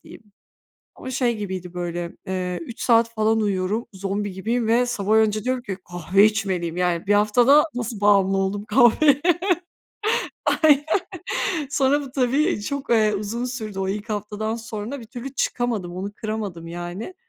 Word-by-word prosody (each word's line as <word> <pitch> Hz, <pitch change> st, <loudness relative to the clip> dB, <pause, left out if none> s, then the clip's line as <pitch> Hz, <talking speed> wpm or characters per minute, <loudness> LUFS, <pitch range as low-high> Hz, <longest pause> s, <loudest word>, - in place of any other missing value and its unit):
diyeyim. -, -, -14 dB, 0.7 s
Ama 260 Hz, -, -7 dB
şey 240 Hz, -3 st, 0 dB
gibiydi 185 Hz, -3 st, -5 dB
böyle, 175 Hz, -1 st, -4 dB, 0.2 s
eee, 180 Hz, -1 st, -2 dB
3 230 Hz, +8 st, -9 dB
saat 230 Hz, -1 st, +4 dB
falan 220 Hz, 0 st, +2 dB
uyuyorum, 200 Hz, +2 st, -1 dB
zombi 195 Hz, +1 st, -3 dB
gibiyim 225 Hz, +4 st, -1 dB
ve 240 Hz, +2 st, +3 dB
sabah 215 Hz, -3 st, 0 dB
önce 215 Hz, -1 st, +2 dB
diyorum 255 Hz, +1 st, -1 dB
ki: 195 Hz, -5 st, -5 dB
"Kahve 180 Hz, +4 st, +3 dB
içmeliyim." 190 Hz, -6 st, -1 dB
Yani 180 Hz, 0 st, 0 dB
1 205 Hz, -, +4 dB
haftada 240 Hz, +8 st, +5 dB
nasıl 235 Hz, -3 st, -4 dB
bağımlı 195 Hz, -2 st, +4 dB
oldum 195 Hz, +2 st, -1 dB
kahveye? 255 Hz, +6 st, +5 dB, 1.4 s
Aynen. 290 Hz, -2 st, +6 dB, 0.9 s
Sonra 285 Hz, 0 st, +2 dB
bu 275 Hz, -2 st, -8 dB
tabii 270 Hz, -, +1 dB
çok, 280 Hz, +6 st, -4 dB
eee, 215 Hz, -3 st, +4 dB
uzun 215 Hz, +4 st, -3 dB
sürdü. 220 Hz, -6 st, -5 dB
O 190 Hz, -, -1 dB
ilk 210 Hz, +3 st, -4 dB
haftadan 210 Hz, +1 st, -3 dB
sonra 225 Hz, +3 st, -6 dB
bir 230 Hz, -, -10 dB
türlü 245 Hz, +3 st, -8 dB
çıkamadım, 225 Hz, -8 st, -1 dB
onu 195 Hz, +2 st, -4 dB
kıramadım 210 Hz, -6 st, -5 dB
yani. 175 Hz, -, -6 dB
215 Hz, 155 wpm, -23 LUFS, 195-240 Hz, 1.4 s, Aynen